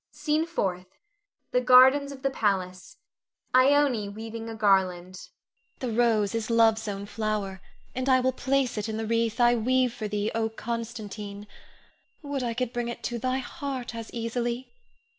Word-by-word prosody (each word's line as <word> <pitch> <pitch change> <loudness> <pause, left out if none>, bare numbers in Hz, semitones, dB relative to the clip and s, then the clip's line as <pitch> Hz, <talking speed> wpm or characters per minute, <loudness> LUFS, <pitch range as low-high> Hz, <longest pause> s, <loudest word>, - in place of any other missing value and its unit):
SCENE 300 +2 -1
FOURTH. 185 - -2 0.6
[The 250 - +2
gardens 260 +3 +6
of 270 -1 -11
the 275 - +1
palace. 185 -6 -2 0.6
Ione 260 -5 +4
weaving 225 +2 -7
a 225 - -6
garland.] 185 -3 +1
Ione. - - -42
The 250 -3 -3
rose 225 -4 +2
is 225 -1 -2
Love's 225 -1 +3
own 200 -1 -4
flower, 205 -3 -3 0.3
and 255 +1 -2
I 260 -1 +5
will 260 +1 +2
place 265 -3 0
it 210 +2 -3
in 220 - -3
the 225 - -3
wreath 230 +1 0
I 240 0 +5
weave 250 +1 +1
for 215 - -4
thee, 210 0 -2
O 225 0 0
Constantine! 215 -3 -6 0.8
Would 285 -2 -3
I 235 -2 -2
could 250 -1 -2
bring 240 -1 -2
it 235 - -6
to 240 -1 -3
thy 255 +2 0
heart 265 -2 -5
as 230 -1 -7
easily! 240 - -3
230 Hz, 165 wpm, -27 LUFS, 215-255 Hz, 0.8 s, gardens